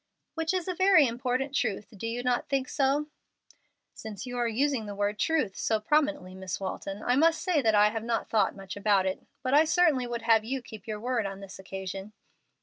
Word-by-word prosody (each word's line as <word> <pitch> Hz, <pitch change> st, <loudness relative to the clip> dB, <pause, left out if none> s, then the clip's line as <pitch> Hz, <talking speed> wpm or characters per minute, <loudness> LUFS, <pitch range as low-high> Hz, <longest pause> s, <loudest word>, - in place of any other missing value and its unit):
"Which 325 Hz, -1 st, -1 dB
is 370 Hz, -2 st, -2 dB
a 365 Hz, -, -1 dB
very 375 Hz, -4 st, +5 dB
important 255 Hz, +3 st, -1 dB
truth: 220 Hz, -8 st, -1 dB
do 215 Hz, +3 st, -5 dB
you 240 Hz, +2 st, -3 dB
not 250 Hz, -1 st, 0 dB
think 270 Hz, -2 st, 0 dB
so?" 280 Hz, +2 st, +1 dB, 0.9 s
"Since 215 Hz, 0 st, -8 dB
you 245 Hz, -1 st, -6 dB
are 240 Hz, -, +1 dB
using 245 Hz, 0 st, 0 dB
the 205 Hz, -, -6 dB
word 205 Hz, +1 st, -1 dB
'truth' 310 Hz, -, +1 dB
so 220 Hz, -1 st, 0 dB
prominently, 290 Hz, -6 st, 0 dB
Miss 190 Hz, -1 st, -5 dB
Walton, 195 Hz, +1 st, -5 dB
I 245 Hz, -, +2 dB
must 325 Hz, +4 st, +4 dB
say 360 Hz, -6 st, +2 dB
that 220 Hz, -3 st, +3 dB
I 210 Hz, 0 st, +6 dB
have 225 Hz, 0 st, -4 dB
not 230 Hz, 0 st, -1 dB
thought 220 Hz, -, +1 dB
much 195 Hz, -1 st, -8 dB
about 200 Hz, -2 st, +2 dB
it. 190 Hz, -, -3 dB, 0.2 s
But 260 Hz, 0 st, 0 dB
I 295 Hz, +2 st, +7 dB
certainly 315 Hz, -6 st, +3 dB
would 235 Hz, -1 st, -4 dB
have 225 Hz, -1 st, +4 dB
you 255 Hz, +3 st, -3 dB
keep 220 Hz, -3 st, -11 dB
your 215 Hz, -1 st, -4 dB
word 235 Hz, -2 st, -1 dB
on 195 Hz, 0 st, -7 dB
this 195 Hz, -1 st, -10 dB
occasion." 190 Hz, +1 st, -6 dB
235 Hz, 215 wpm, -28 LUFS, 205-280 Hz, 0.9 s, I